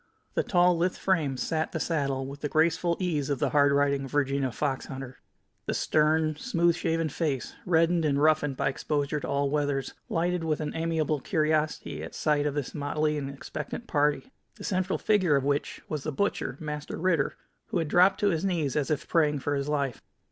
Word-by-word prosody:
The - - +2
tall, 175 -2 +3
lithe 180 +2 +1
frame 155 -9 0
sat 160 +4 -1
the 160 - -1
saddle 140 -5 -1
with 140 +1 -8
the 145 - -2
graceful 165 +2 +2
ease 155 -7 -1
of 140 - 0
the - - 0
hard 145 -1 +4
riding 140 -1 +2
Virginia 135 -1 0
fox 135 +3 -2
hunter. 130 -1 -8 0.5
The - - 0
stern, 155 0 +2
smooth 170 -5 +2
shaven 165 0 0
face, 145 -4 -2
reddened 165 0 +3
and 140 -2 +2
roughened 150 -2 +3
by 140 - +1
exposure 145 +1 -1
to - - -5
all 140 0 0
weathers, 145 -2 -1 0.2
lighted 175 +1 0
with 155 -2 0
an 150 -1 -4
amiable 160 -2 0
curiosity 155 +2 0
at - - -8
sight 150 -1 +1
of 145 - -2
this 145 -4 -3
motley 150 +1 0
and 135 -1 -4
expectant 145 - -6
party, 150 - +1 0.2
the 200 - -11
central 185 -1 0
figure 190 -8 +3
of 140 - +1
which 140 +1 -1
was 155 -2 -3
the 155 - -3
butcher, 200 +8 -1
Master 150 -2 -5
Ritter, 165 -5 +1 0.3
who - - -2
had 165 -2 0
dropped 185 +5 +4
to 205 - +4
his 165 0 -1
knees, 170 -8 0
as 150 -2 0
if 150 -2 -1
praying 150 -3 +2
for 145 - -1
his 140 0 -1
life. 140 -4 -1
150 Hz, 195 wpm, -28 LUFS, 140-165 Hz, 0.5 s, hard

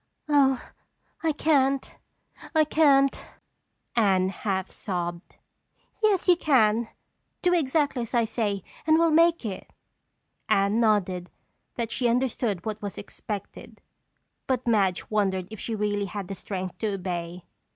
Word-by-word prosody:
"Oh, 275 -3 +4 0.6
I 325 - +1
can't, 275 -3 +1 0.6
I 315 - +6
can't," 280 -3 +3 0.7
Anne 190 -5 +3
half 190 -1 -3
sobbed. 175 -2 -5 0.6
"Yes, 415 -4 +2
you 360 - +7
can. 235 -8 +2 0.5
Do 355 0 +3
exactly 290 -4 +1
as 235 +1 -4
I 235 -1 +3
say 205 -4 -2 0.2
and 315 0 +5
we'll 330 0 +3
make 335 -2 +4
it." 195 -4 -6 0.8
Anne 200 +3 +3
nodded 190 -5 +1 0.5
that 230 -2 -3
she 245 - 0
understood 235 -6 0
what 215 -1 -4
was 205 -2 -5
expected 205 -2 -8 0.7
but 255 -2 0
Madge 200 -6 +1
wondered 190 -4 0
if 220 - -8
she 225 - -3
really 205 -1 -1
had 200 -2 -6
the - - -3
strength 185 -1 -5
to 210 -3 -1
obey. 175 -2 -5
220 Hz, 130 wpm, -26 LUFS, 195-270 Hz, 0.8 s, you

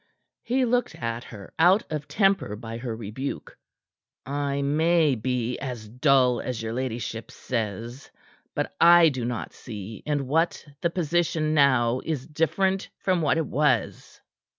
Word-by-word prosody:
He 255 +2 +1
looked 245 +1 0
at 115 0 -4
her, 100 -4 -11
out 185 +6 +5
of 150 -2 -3
temper 195 - +1
by 115 +1 -7
her 120 -2 -4
rebuke. 115 +5 -6 0.7
"I 140 0 -1
may 160 +1 +3
be 125 +1 -2
as 125 -5 -6
dull 125 +1 +3
as 125 -3 -4
your 115 0 -4
ladyship 120 -2 -4
says 115 +2 -4 0.5
but - - -2
I 170 -1 +8
do 130 -4 -4
not 120 -1 -4
see 105 -2 -8
in 145 -2 -1
what 160 +6 0 0.2
the 170 - +2
position 165 -2 0
now 130 -4 +3
is 145 -5 -3
different 190 +5 0
from 185 -3 0
what 155 +1 +2
it 165 - 0
was." 130 -6 0
135 Hz, 145 wpm, -25 LUFS, 120-160 Hz, 0.7 s, I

